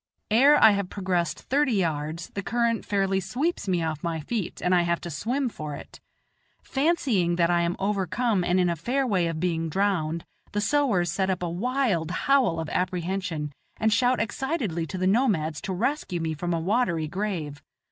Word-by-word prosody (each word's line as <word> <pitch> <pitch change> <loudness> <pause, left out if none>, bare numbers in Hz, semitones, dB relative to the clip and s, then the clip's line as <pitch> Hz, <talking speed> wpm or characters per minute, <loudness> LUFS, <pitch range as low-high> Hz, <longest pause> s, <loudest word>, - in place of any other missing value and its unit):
Ere 275 +7 +6
I 220 - +8
have 200 -2 -1
progressed 185 -3 -1
thirty 280 -1 +1
yards, 165 -3 -2
the 200 - -3
current 235 +1 0
fairly 195 -1 +1
sweeps 250 - -2
me 180 -3 +1
off 155 -2 -3
my 165 -1 -2
feet 200 +4 -4
and 180 - +1
I 180 - +5
have 170 0 0
to 175 - -6
swim 250 - -1
for 155 -10 -6
it. - - -11 0.6
Fancying 265 - +1
that 170 0 +2
I 175 0 +3
am 170 +1 0
overcome 200 +1 0
and 175 +1 +2
in 180 - +3
a 170 - 0
fair 255 - -1
way 185 -8 +1
of 165 -1 -3
being 165 -2 -1
drowned, 170 -3 0 0.3
the 205 - 0
sowars 205 - +2
set 190 +2 0
up 185 -1 -1
a 175 - -1
wild 210 - 0
howl 235 -3 +2
of 160 - -3
apprehension, 180 -4 -2 0.2
and 220 0 +2
shout 245 +4 +3
excitedly 230 - -2
to 185 - -5
the 185 - 0
nomads 185 - +1
to - - -4
rescue 225 - -1
me 160 -1 -2
from 175 +3 -3
a 165 - +1
watery 175 -4 +1
grave. 165 -6 -3
185 Hz, 190 wpm, -26 LUFS, 170-230 Hz, 0.6 s, I